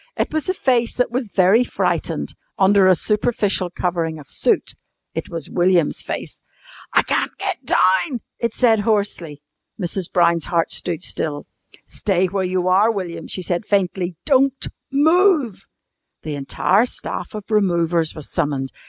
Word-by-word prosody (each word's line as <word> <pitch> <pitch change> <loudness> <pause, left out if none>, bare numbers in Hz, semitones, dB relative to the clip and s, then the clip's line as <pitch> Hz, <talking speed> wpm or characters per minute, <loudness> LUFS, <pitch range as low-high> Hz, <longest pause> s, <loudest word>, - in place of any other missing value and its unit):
It - - -1
was 315 +3 -1
a 370 - 0
face 240 -6 +1
that 250 - 0
was 250 0 -2
very 195 +4 +4
frightened, - - -2 0.2
under 195 0 +5
a 185 - +6
superficial 210 -2 +1
covering 170 -3 -2
of 145 -3 -13
soot. - - +1 0.4
It - - -5
was 165 -4 -5
William's 175 -3 +2
face. - - -6 0.5
"I - - +4
can't - - -1
get 380 -8 -3
down," 230 - +2 0.2
it 235 -2 -2
said 230 -4 +3
hoarsely. 200 -8 -1 0.4
Mrs. 180 -1 -3
Brown's 170 -2 +2
heart 170 -1 0
stood 175 -1 -2
still. 145 -5 -3 0.4
"Stay 190 -2 +1
where 190 +1 -1
you 185 0 -1
are, 195 +4 +4
William," 185 -6 -4
she 185 - -3
said 175 +3 -2
faintly. 185 -3 0
"Don't 270 -1 +2 0.2
move." 310 - +3 0.6
The 155 - -4
entire 180 - +1
staff 240 - -5
of 210 - -5
removers 170 -5 +1
was 155 - -8
summoned. 140 -5 -2
190 Hz, 150 wpm, -20 LUFS, 170-230 Hz, 0.6 s, a